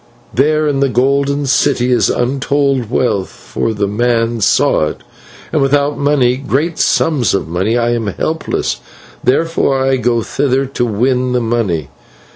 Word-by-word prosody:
There 155 +3 +2
in 140 -2 0
the 140 0 +2
Golden 140 +3 +1
City 125 -1 +1
is 125 - +3
untold 135 -1 0
wealth, 105 -6 0
for 115 - -4
the 105 -2 -1
man 115 +1 0
saw 90 - +3
it, - - -7 0.5
and - - +1
without 140 +1 +2
money, 135 -4 +2
great 145 +5 -2
sums 135 -11 +2
of 100 - -2
money, 95 +8 0
I 120 0 +1
am 115 -2 -1
helpless, 160 - -2 0.5
therefore 135 0 +1
I 135 0 +2
go 120 -2 0
thither 135 +2 0
to 130 -2 -2
win 125 +3 0
the 125 - +2
money. 110 - -1
125 Hz, 150 wpm, -15 LUFS, 115-140 Hz, 0.5 s, is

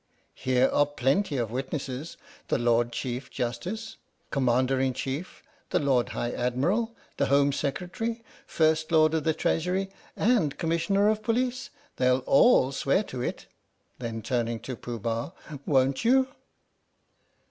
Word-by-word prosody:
Here 130 0 +2
are 145 - +3
plenty 145 +4 0
of 115 -3 -1
witnesses 135 +3 -4 0.3
the - - +1
Lord 120 -1 +2
Chief 125 +1 -4
Justice, 180 - -4 0.3
Commander 130 0 +2
in 130 -1 +1
Chief, 140 +7 -5 0.3
the - - +1
Lord 135 -4 +2
High 120 - -2
Admiral, 170 - 0 0.2
the - - +1
Home 140 +1 +4
Secretary, 185 +11 -3 0.2
First 155 0 +1
Lord 155 -1 +5
of 160 -2 0
the 160 -1 +2
Treasury, 185 +4 0 0.3
and 205 - +2
Commissioner 170 +5 +1
of 215 0 0
Police. 245 +3 -1 0.3
They'll 125 0 +2
all 140 - +5
swear 140 +8 +1
to 130 -10 -6
it - - -4 0.5
[then 115 -2 -5
turning 120 -1 -1
to 130 - -5
Pooh 120 +1 -6
Bah], 115 - -3 0.3
won't 135 +1 +2
you?" 260 +3 +4
140 Hz, 135 wpm, -27 LUFS, 125-180 Hz, 0.5 s, Lord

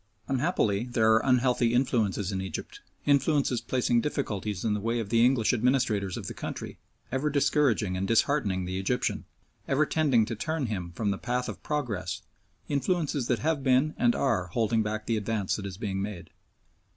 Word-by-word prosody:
Unhappily 125 - +1
there 110 -3 +3
are 110 - +4
unhealthy 125 -2 +2
influences 105 -6 +1
in 95 -1 -2
Egypt 95 - -6 0.3
influences 140 -3 +2
placing 120 -2 +1
difficulties 105 -9 -3
in 110 - +2
the 105 - -1
way 115 +3 -1
of 110 -3 -4
the 115 +1 +4
English 125 -3 +3
administrators 115 -6 +1
of - - -6
the - - -5
country, - - -6 0.3
ever 130 +4 0
discouraging 140 -9 +2
and 95 +1 -2
disheartening 105 -5 +1
the 95 +1 -3
Egyptian, 125 +6 -1 0.4
ever 140 +3 +3
tending 140 -8 +2
to 115 - -4
turn 155 +5 -2
him 95 -6 -4
from 105 -1 0
the 95 - -3
path 125 0 -2
of - - -7
progress, 105 - -3 0.4
influences 145 -2 0
that 115 +3 -1
have 160 -3 +1
been 130 +4 +3
and 120 -1 +2
are 110 -10 +1
holding 110 +4 +1
back 110 0 -3
the 115 - 0
advance 105 -2 -1
that 100 -2 -5
is 95 -2 -8
being 100 -3 -3
made. 100 -3 -6
115 Hz, 175 wpm, -28 LUFS, 105-135 Hz, 0.4 s, are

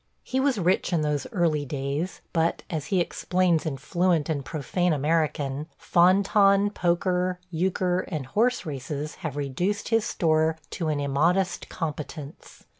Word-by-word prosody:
He 260 - -1
was 265 -2 +2
rich 185 0 +1
in 170 -3 +2
those 150 -2 -1
early 165 -5 +1
days, 140 +5 -3
but, 165 -1 +1
as 155 -3 -3
he 190 - +1
explains 175 -1 +1
in 140 -3 -2
fluent 170 +1 +1
and 145 -3 -1
profane 165 +4 -1
American, 150 -1 0
fan 185 +3 +4
tan, 200 0 +4
poker, 180 0 0
euchre, 180 +1 0
and 155 -7 -4
horse 230 - +1
races 145 +1 -5
have 150 -3 -4
reduced 175 +10 -2
his 225 -1 +3
store 160 -3 +1
to 165 - -3
an 150 -2 0
immodest 165 +7 +1
competence. 150 -2 -6
165 Hz, 145 wpm, -26 LUFS, 150-185 Hz, -, fan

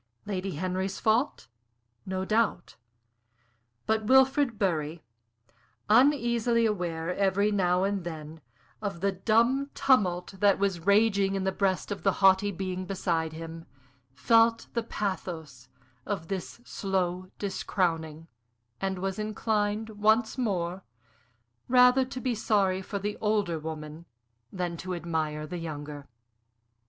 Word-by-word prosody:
Lady 195 -3 -3
Henry's 185 +3 -2
fault, 225 +6 +1 0.6
no 190 0 -2
doubt; 215 -4 0 1.1
but 220 0 0
Wilfrid 265 0 +4
Bury, 165 -4 -1 0.9
uneasily 235 -2 +4
aware 175 -5 -1
every 200 +1 +2
now 180 -2 +2
and 200 -1 -1
then 160 -1 -7 0.4
of 200 -5 -4
the 200 0 +2
dumb 235 +8 +2
tumult 195 -10 +2
that 200 0 +4
was 195 -3 0
raging 200 -2 +3
in 195 - -1
the 190 - +1
breast 190 0 -1
of 200 - -4
the 195 - +2
haughty 195 +1 +4
being 185 0 -4
beside 170 -5 -1
him, 165 0 -8 0.5
felt 230 - +4
the 235 - 0
pathos 165 - -5 0.3
of 180 -3 -4
this 195 +4 -5
slow 185 -2 -2
discrowning, 165 -5 -2 0.5
and 190 -1 -2
was 190 +2 -3
inclined, 215 0 -1
once 220 +2 +2
more, 190 -7 -2 0.8
rather 250 +1 +6
to 255 0 -6
be 255 -1 -1
sorry 200 -4 +1
for 200 +2 -5
the 205 +1 -3
older 205 -6 0
woman 155 +1 -7 0.4
than 175 -3 -3
to 185 +1 -4
admire 160 -3 -2
the 175 +3 -6
younger. 145 -3 -7
195 Hz, 125 wpm, -28 LUFS, 175-215 Hz, 1.1 s, rather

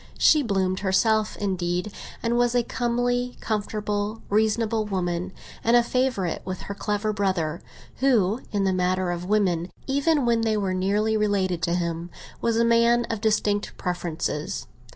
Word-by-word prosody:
She 305 - +5
bloomed 190 -6 0
herself, 215 +3 +2
indeed, 180 -1 -1 0.3
and 235 0 +1
was 240 0 +2
a 245 - +3
comely, 245 +1 -1
comfortable, 210 0 -2
reasonable 220 +1 +1
woman, 180 -3 -2 0.3
and 235 +1 +5
a 240 - +4
favourite 245 -8 -1
with 185 -1 -5
her 200 - -5
clever 210 +1 -1
brother, 185 -6 -1 0.4
who, 235 -4 +2
in 205 -1 0
the 190 -1 +2
matter 185 0 +1
of 175 0 -4
women, 185 -5 +1 0.2
even 280 +1 +2
when 235 -1 +2
they 220 -1 +1
were 195 -2 -1
nearly 205 +4 +1
related 195 -5 0
to 170 +1 +1
him, 170 -1 -2 0.3
was 230 -1 +1
a 230 - +4
man 235 +1 +4
of 225 -2 -3
distinct 210 -1 0
preferences. 170 -4 -3
210 Hz, 150 wpm, -25 LUFS, 185-230 Hz, 0.4 s, She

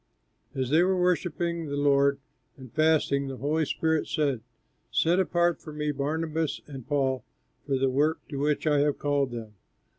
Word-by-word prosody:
As 130 -1 -2
they 160 +3 +5
were 185 +1 +2
worshipping 170 -2 0
the 145 0 -3
Lord 140 -1 +3 0.4
and 130 -3 -12
fasting, 155 -3 +2
the 135 -1 -5
Holy 155 +4 0
Spirit 160 -1 0
said, 140 -7 0 0.5
"Set 170 +3 +2
apart 175 -2 +1
for 155 - -9
me 150 0 -1
Barnabas 155 +2 -2
and 135 -5 -9
Paul 135 -4 0 0.4
for 135 -2 +1
the 135 +1 +2
work 145 +5 0
to 140 - -4
which 150 +2 0
I 150 -2 +3
have 145 0 +2
called 145 -2 +1
them." 115 -3 -7
145 Hz, 170 wpm, -27 LUFS, 140-160 Hz, 0.5 s, they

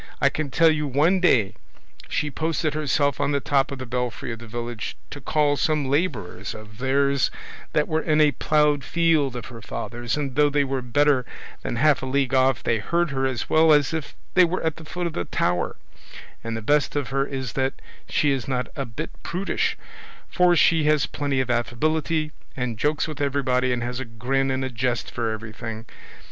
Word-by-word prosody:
I - - +4
can 155 -2 -3
tell 165 +4 +5
you 150 -1 -1
one 155 +8 +3
day 115 - +3 0.6
she 150 - -1
posted 160 0 -1
herself 145 -2 +1
on 145 - +1
the 140 - +2
top 135 0 +1
of 140 - -4
the 130 - -6
belfry 125 -1 -3
of 115 - -8
the 120 - -10
village 120 -1 -5
to 145 - -7
call 145 +2 +2
some 150 -3 +1
labourers 130 - -1
of 110 0 -12
theirs 140 0 +2 0.4
that 150 - +2
were 160 0 0
in 155 -1 +2
a 150 -1 +6
ploughed 150 +1 +2
field 160 -4 +2
of 120 -2 -5
her 115 - -9
father's, 120 +4 -4
and 140 -3 -2
though 145 0 +4
they 145 0 +2
were 135 -1 -2
better 135 +2 +2 0.4
than - - -3
half 140 +1 +3
a 130 - -4
league 135 0 0
off 130 -5 +3
they 115 -1 +1
heard 170 +7 0
her 135 -1 0
as 130 -3 -3
well 160 0 +5
as 145 +1 +4
if 160 -3 -4 0.2
they 185 - +7
were 175 +2 0
at 160 -1 -1
the 165 - -10
foot 175 +2 -4
of 170 - -2
the 90 - -2
tower; 90 0 0 0.7
and 115 0 -3
the 110 - -6
best 145 +5 +2
of 140 -5 -1
her 135 +2 +1
is 130 -3 -4
that 135 0 0 0.3
she 150 - +2
is 135 0 -2
not 125 -2 -1
a 140 - -2
bit 120 +8 -6
prudish, 185 +3 -1 0.5
for 180 -1 +3
she 160 -2 +4
has 150 -1 +3
plenty 140 -2 -2
of 130 -1 0
affability, 155 +6 0 0.3
and 125 -4 -3
jokes 150 +5 +1
with 155 -2 -6
everybody, 130 -3 +1
and 120 -1 -1
has 125 +1 -3
a 130 - -4
grin 125 +4 -1
and 130 0 -1
a - - -3
jest 120 -1 -1
for 115 -1 -2
everything. 110 +1 -6
135 Hz, 205 wpm, -24 LUFS, 125-150 Hz, 0.7 s, they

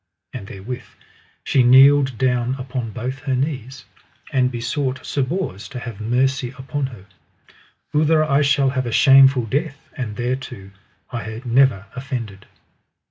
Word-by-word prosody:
And 100 - -7
therewith 120 +7 -7 0.6
she 135 - +2
kneeled 135 +1 +6
down 125 0 0
upon 130 -3 -5
both 125 +4 -5
her 135 -1 -2
knees, 130 -4 -4 0.5
and 130 -2 +3
besought 130 +2 -3
Sir 140 - -1
Bors 130 - -3
to 135 - -9
have 115 -4 -8
mercy 125 +3 0
upon 135 +1 -3
her: 115 -7 -13 0.9
Outher 155 +1 +3
I 145 -1 +2
shall 140 -1 +2
have 130 -2 -2
a - - -3
shameful 135 -1 +6
death, 145 +6 -2 0.2
and 120 -8 -5
thereto 125 -5 -4 0.4
I 115 -1 -6
never 120 -5 +3
offended. 120 -7 -6
130 Hz, 135 wpm, -21 LUFS, 120-135 Hz, 0.9 s, kneeled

